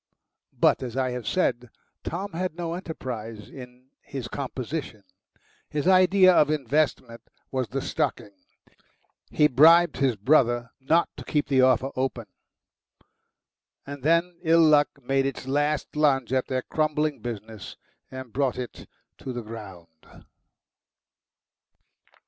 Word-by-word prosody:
But, - - +3
as 125 -1 -6
I 130 -1 0
have 125 -1 -6
said, 125 -10 0 0.3
Tom 195 +5 -4
had 180 0 -3
no 170 -1 -3
enterprise 120 - -7
in 125 0 -13
his 130 -4 -7
composition. 130 -3 -5 0.7
His 150 +3 -2
idea 185 0 +6
of 150 -4 +4
investment 140 -4 -1 0.3
was 130 -2 -1
the - - -4
stocking; 105 - -2 1.0
he 150 - +4
bribed 165 +5 +5
his 135 -4 +1
brother 120 +1 +2
not 160 +6 +2
to - - -8
keep 150 -2 -1
the 135 -2 +4
offer 130 +1 +3
open. 130 +1 -2 1.6
And 140 0 -8
then 170 +4 +1
ill 165 -1 +4
luck 150 -2 +5
made 135 +2 +1
its 135 -1 -6
last 145 +2 -1
lunge 135 -5 +2
at 130 -1 0
their 130 -1 -2
crumbling 155 -1 -1
business 110 -3 -8 0.3
and 130 -3 -9
brought 135 -1 0
it 125 -1 -7 0.3
to 130 - -6
the 120 -1 -5
ground. 95 -8 -12
135 Hz, 125 wpm, -25 LUFS, 125-155 Hz, 1.6 s, idea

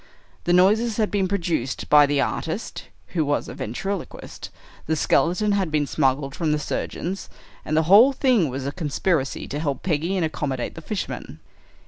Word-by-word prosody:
The 175 - +1
noises 210 +6 +4
had 215 -2 +1
been 195 -2 +1
produced 170 -9 -2
by 150 -1 +6
the 145 0 +1
artist, 165 +8 -3 0.2
who 165 -3 0
was 145 0 -1
a - - -7
ventriloquist, 190 - -5 0.4
the 160 - +1
skeleton 180 +6 +2
had 195 -4 +1
been 150 -1 +1
smuggled 135 -1 0
from 160 -1 -1
the 150 - +2
surgeons, 175 +5 -4 0.3
and 155 - -1
the 160 - +4
whole 205 - +7
thing 250 - +2
was 130 +1 -5
a 140 - -2
conspiracy 155 -2 -1
to 145 - -4
help 145 -4 -2
Peggy 170 +1 0
and 180 -4 +1
accommodate 135 -5 -3
the 165 - -9
fishermen." 165 - -5
160 Hz, 170 wpm, -23 LUFS, 145-195 Hz, 0.4 s, whole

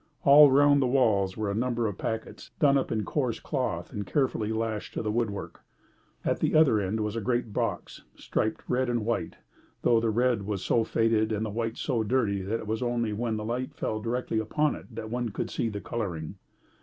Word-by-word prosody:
All 145 +1 +9
round 145 +1 +5
the 130 - +2
walls 105 -7 +2
were 105 -2 -1
a - - -2
number 120 +1 0
of 105 -3 -2
packets 110 0 -5
done 140 -2 +4
up 135 - 0
in 110 -2 -1
coarse 130 -6 -1
cloth 125 - -3
and 105 - -3
carefully 110 -1 0
lashed 110 -1 -3
to - - -2
the 105 - -1
woodwork. 110 -3 -3 0.6
At - - +1
the - - +1
other 155 -9 +5
end 105 +3 -1
was 105 +1 -2
a 115 - -2
great 120 0 -1
box, - - -3
striped 110 - -2
red 125 0 +1
and 120 -3 -1
white, 115 0 -2 0.5
though 115 - +4
the 115 0 0
red 120 0 +2
was 100 -2 -4
so 115 - +3
faded 110 -1 +1
and 110 0 -1
the 110 - -4
white 115 +1 -3
so 125 -6 -1
dirty 110 -3 +1
that 105 +5 -2
it - - -8
was 110 +2 -2
only 120 -3 0
where 115 +2 -2
the 105 -1 -3
light 125 +3 -3
fell 110 0 -2
directly 115 0 -1
upon 150 +8 +1
it - - -10
that 110 -1 -6
one 120 -1 -1
could 100 - -4
see 115 - -1
the 105 -1 -5
colouring. 90 -8 -4
115 Hz, 215 wpm, -28 LUFS, 105-125 Hz, 0.6 s, All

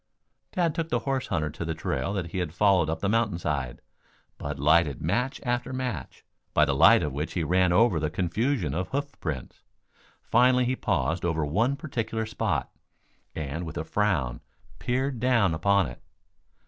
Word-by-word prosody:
Tad 170 -3 +1
took 165 0 -3
the - - +1
horse 135 -2 -2
hunter 75 -2 -1
to 80 - -6
the 80 -1 -3
trail 65 +2 -2
that 90 -5 -3
he 95 - -2
had 85 -2 -3
followed 95 -6 +3
up 80 0 -3
the 100 - 0
mountain 105 -3 +1
side. 70 -8 -3 0.6
Bud 70 0 -4
lighted 75 -1 +3
match 120 - -1
after 120 -1 -1
match, 125 - -5 0.3
by 75 - +6
the 70 - 0
light 85 +9 +6
of 75 -3 -2
which 75 +3 -3
he 85 - -1
ran 90 +3 +3
over 100 -2 +4
the 75 0 -1
confusion 95 - -1
of 90 +4 -2
hoofprints. 130 - -5 0.6
Finally 125 +1 +4
he 130 +1 0
paused 85 -8 -1
over 80 -3 0
one 115 - +1
particular 115 -6 -3
spot, 110 -6 -2 0.6
and 80 +2 -4
with 80 -2 -6
a - - -2
frown 80 -13 0 0.4
peered 130 0 -1
down 115 -7 +3
upon 100 +4 +3
it. - - -8
90 Hz, 175 wpm, -27 LUFS, 80-120 Hz, 0.6 s, by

